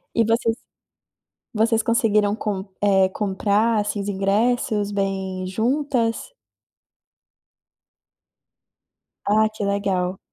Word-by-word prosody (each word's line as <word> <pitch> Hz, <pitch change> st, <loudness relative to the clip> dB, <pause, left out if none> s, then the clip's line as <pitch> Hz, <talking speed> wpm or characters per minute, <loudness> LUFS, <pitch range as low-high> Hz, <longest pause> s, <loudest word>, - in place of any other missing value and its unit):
E 230 Hz, -, +4 dB
vocês 230 Hz, 0 st, +1 dB, 1.0 s
vocês 225 Hz, +1 st, +2 dB
conseguiram 215 Hz, -3 st, +2 dB
com, 205 Hz, -3 st, -3 dB
eh, 195 Hz, -2 st, +3 dB
comprar 210 Hz, +3 st, +1 dB
esses 205 Hz, -1 st, -3 dB
ingressos 210 Hz, +2 st, 0 dB
bem 190 Hz, -2 st, -2 dB
juntas? 240 Hz, -, -1 dB, 2.9 s
Ah, 215 Hz, +1 st, +3 dB
que 215 Hz, -1 st, -4 dB
legal. 195 Hz, -2 st, -1 dB
210 Hz, 80 wpm, -22 LUFS, 195-225 Hz, 2.9 s, E